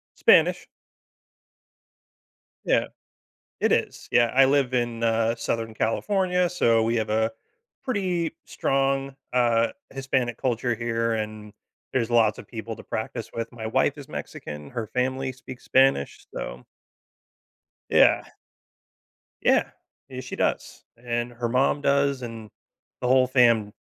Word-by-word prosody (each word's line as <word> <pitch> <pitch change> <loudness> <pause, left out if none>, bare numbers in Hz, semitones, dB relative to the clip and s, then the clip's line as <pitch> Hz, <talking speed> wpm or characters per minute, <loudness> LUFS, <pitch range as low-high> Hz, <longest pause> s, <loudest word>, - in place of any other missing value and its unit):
Spanish. - - +4 2.0
Yeah. - - +2 0.7
It - - +2
is. - - -1
Yeah. 120 -1 +5
I 135 0 +7
live 135 -2 +2
in, 120 -2 -1
uh, 115 0 +2
Southern 115 -2 -3
California, 180 - +1
so 115 -10 +3
we 115 +1 0
have 110 -1 -1
a 110 +1 +1 0.5
pretty 185 -9 -1
strong, 135 0 0 0.2
uh, 120 -2 +3 0.2
Hispanic 130 -3 -1
culture 120 -2 -1
here, 115 0 -1
and 110 -1 -5 0.4
there's 120 -3 0
lots 110 -3 +4
of - - -11
people 115 -1 -6
to - - -12
practice 110 +1 -5
with. 115 0 -4
My 115 -2 -8
wife - - +1
is - - -10
Mexican. 75 0 -7
Her 115 -3 -4
family 130 +2 -1
speaks 130 0 -11
Spanish. 130 - +2
So - - -6 1.3
Yeah. - - +5 1.2
Yeah, - - +3 0.4
yeah, 130 -1 -7
she 125 - -7
does. - - -2 0.2
And 120 0 -2
her 120 0 -3
mom 130 +4 +2
does 140 -1 +2
and 115 -2 -7 0.5
the 125 - -1
whole 130 0 +5
fam 115 -5 +3
120 Hz, 130 wpm, -25 LUFS, 115-135 Hz, 2.0 s, I